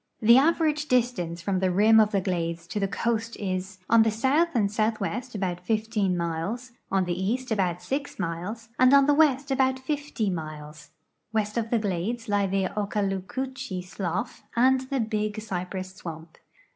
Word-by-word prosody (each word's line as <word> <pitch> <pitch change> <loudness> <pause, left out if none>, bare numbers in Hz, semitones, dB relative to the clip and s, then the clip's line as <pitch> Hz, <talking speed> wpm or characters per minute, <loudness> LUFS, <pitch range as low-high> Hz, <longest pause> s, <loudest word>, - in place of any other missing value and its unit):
The 235 +3 +7
average 305 0 +2
distance 200 - 0
from 190 -1 0
the 190 0 +2
rim 215 +5 +5
of 215 -1 +5
the 200 -2 0
glades 170 -2 -2
to 210 - -2
the 195 - +1
coast 230 +3 -1
is: 190 0 -3
on 230 -1 +6
the 225 - +4
south 265 +10 +2
and 205 -4 +2
southwest 225 +3 -1
about 185 -3 -2
15 215 -1 0
miles, 170 +9 -3 0.2
on 190 -1 +2
the 175 - -1
east 225 +8 -2
about 180 -5 0
6 280 +1 -3
miles, 195 +6 -4
and 255 +2 +7
on 275 -1 +6
the 290 - +4
west 285 -2 +3
about 260 0 +2
50 260 -6 -2
miles. 155 -2 -7 0.4
West 215 -1 -1
of 230 -1 -1
the 235 - +2
glades 215 +4 -2
lie 205 -1 +2
the 195 0 0
Okaloocoochee 205 +2 -3
slough 180 -2 -4
and 260 +2 +4
the 275 - 0
Big 215 -1 -2
Cypress 185 -2 -5
swamp. 165 -3 -9
210 Hz, 170 wpm, -26 LUFS, 185-245 Hz, 0.4 s, The